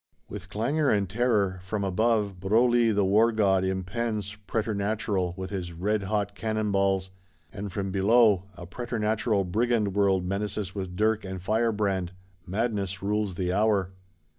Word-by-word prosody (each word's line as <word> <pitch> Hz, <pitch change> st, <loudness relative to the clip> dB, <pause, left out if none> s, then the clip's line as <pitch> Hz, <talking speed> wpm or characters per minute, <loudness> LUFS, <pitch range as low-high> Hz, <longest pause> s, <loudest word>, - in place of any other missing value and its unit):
With 95 Hz, -2 st, -8 dB
clangour 135 Hz, +9 st, 0 dB
and 100 Hz, -2 st, +2 dB
terror: 105 Hz, -3 st, +1 dB
from 100 Hz, +3 st, -3 dB
above, 105 Hz, 0 st, +1 dB
Broglie 115 Hz, +4 st, +3 dB
the 100 Hz, -2 st, +2 dB
war 110 Hz, +4 st, +4 dB
god 100 Hz, -4 st, +2 dB
impends, 100 Hz, +3 st, -2 dB
preternatural, 100 Hz, -4 st, -1 dB
with 95 Hz, +1 st, -5 dB
his 90 Hz, -3 st, -4 dB
redhot 100 Hz, +2 st, -1 dB
cannon 110 Hz, 0 st, -2 dB
balls; 95 Hz, -1 st, +1 dB, 0.4 s
and 100 Hz, 0 st, -5 dB
from 95 Hz, 0 st, -3 dB
below, 100 Hz, 0 st, +4 dB
a 85 Hz, -, -9 dB
preternatural 110 Hz, 0 st, -1 dB
Brigand 110 Hz, +2 st, 0 dB
world 95 Hz, -2 st, +2 dB
menaces 100 Hz, 0 st, -3 dB
with 95 Hz, -3 st, -5 dB
dirk 110 Hz, +2 st, +1 dB
and 95 Hz, -1 st, -5 dB
firebrand: 105 Hz, -3 st, 0 dB, 0.3 s
madness 100 Hz, -1 st, -2 dB
rules 105 Hz, -2 st, -1 dB
the 90 Hz, 0 st, -1 dB
hour. 100 Hz, -2 st, +2 dB
100 Hz, 140 wpm, -27 LUFS, 95-110 Hz, 0.4 s, war